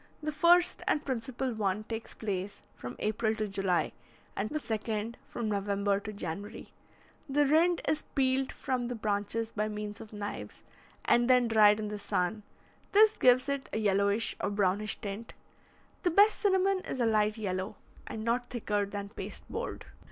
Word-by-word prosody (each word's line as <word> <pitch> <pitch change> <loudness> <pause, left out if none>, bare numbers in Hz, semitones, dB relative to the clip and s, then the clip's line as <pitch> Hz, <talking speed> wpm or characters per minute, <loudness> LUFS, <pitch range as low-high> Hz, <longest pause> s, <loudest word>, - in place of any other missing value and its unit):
The 305 - -1
first 340 +4 +4
and 300 - +1
principal 255 0 -2
one 210 -1 -1
takes 225 +1 -6
place 200 -2 -4
from 120 - -7
April 220 +1 0
to 215 -1 -2
July, 195 -3 0 0.4
and 210 +2 -2
the 305 - -2
second 220 -2 -3
from 235 -2 -4
November 200 -1 0
to 210 +1 -6
January. 200 +2 -6 0.6
The 290 +2 +3
rind 330 +5 +4
is 305 0 +1
peeled 265 -1 +2
from 250 -2 -2
the 245 - -3
branches 215 +1 -1
by 210 0 -1
means 210 -1 -5
of 215 - -10
knives, 205 -1 -6 0.4
and 240 +1 +4
then 250 -1 +5
dried 215 -2 +6
in 210 -1 -3
the 210 0 -5
sun; 190 +2 -1 0.5
this 430 +1 +7
gives 255 +1 +5
it 280 -1 -2
a - - -2
yellowish 200 +1 +1
or - - 0
brownish 205 +1 0
tint. 205 +3 -6 0.7
The 360 - +2
best 405 +5 +5
cinnamon 385 -1 +3
is 265 - -5
a 240 - +3
light 215 -1 +2
yellow, 185 -3 -3 0.3
and 215 - -5
not 240 +2 0
thicker 210 -4 -1
than 200 0 -5
pasteboard. 225 - -6
220 Hz, 165 wpm, -30 LUFS, 205-255 Hz, 0.7 s, this